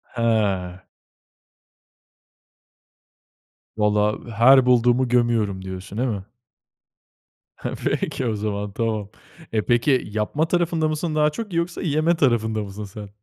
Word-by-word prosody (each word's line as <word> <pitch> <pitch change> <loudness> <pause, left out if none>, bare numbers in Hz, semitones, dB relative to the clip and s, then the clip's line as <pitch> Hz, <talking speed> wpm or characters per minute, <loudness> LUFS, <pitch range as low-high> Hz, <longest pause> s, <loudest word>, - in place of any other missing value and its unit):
Ha. 100 -6 0 2.9
Valla, 105 0 +2 0.2
her 130 +2 +7
bulduğumu 125 +1 +3
gömüyorum 115 -5 +1
diyorsun, 95 +2 -7
değil 125 +2 0
mi? 100 -4 -3 1.3
Heh, - - -5
peki 130 - -1
o 110 -3 0
zaman 105 -1 -3
tamam. 110 -2 -2 0.4
E, 110 - +2
peki, 120 +4 +2 0.2
yapma 110 +10 -1
tarafında 170 -2 +1
mısın 155 +1 -2
daha 150 0 +3
çok 200 +4 -6
yoksa 170 +1 -2
yeme 160 0 +1
tarafında 110 -7 +1
mısın 100 +1 -7
sen? 100 +1 -9
115 Hz, 115 wpm, -23 LUFS, 105-150 Hz, 2.9 s, her